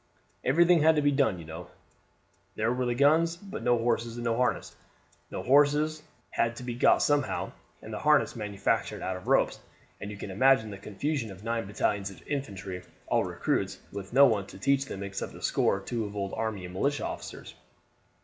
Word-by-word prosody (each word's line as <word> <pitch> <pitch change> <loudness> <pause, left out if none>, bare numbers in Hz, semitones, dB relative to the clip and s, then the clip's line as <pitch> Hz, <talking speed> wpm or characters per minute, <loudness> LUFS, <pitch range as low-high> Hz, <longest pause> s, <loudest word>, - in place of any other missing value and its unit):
"Everything 170 +4 +4
had 160 +1 +5
to 150 - +2
be 145 - +4
done, 135 -9 +2
you 85 - -9
know. 80 +2 -8 0.9
There 110 +3 +1
were 125 0 -1
the 120 - 0
guns, 160 +5 +4
but 200 +4 -8
no 120 0 +3
horses 115 0 0
and 120 - -5
no 115 -1 +1
harness. 125 +1 -1 0.5
The - - -5
horses 145 +3 +3 0.3
had 115 0 0
to 125 - -8
be 125 -1 -3
got 120 - +4
somehow, 145 -2 0 0.3
and 110 - -8
the - - -4
harness 150 -3 +3
manufactured 105 -3 -1
out 95 - -2
of 90 - -9
ropes; - - +2 0.4
and 100 - -6
you 105 - -7
can 100 - -6
imagine 110 +1 +3
the 100 - -8
confusion 115 +5 -3
of 95 +1 -11
nine 115 -2 -2
battalions 100 -1 -1
of 95 - -14
infantry, 100 -10 -4 0.2
all - - +2
recruits, - - -1
with 100 -1 -7
no 135 +3 +7
one 105 -6 +1
to 95 - -11
teach 140 +6 +2
them 100 -6 -6
except 100 0 -5
a - - -11
score - - +2
or - - -8
two 115 +3 -3
of 105 0 -7
old 100 -1 -3
army 110 -5 -3
and 90 - -9
militia 140 +10 0
officers. - - -7
115 Hz, 200 wpm, -28 LUFS, 100-140 Hz, 0.9 s, no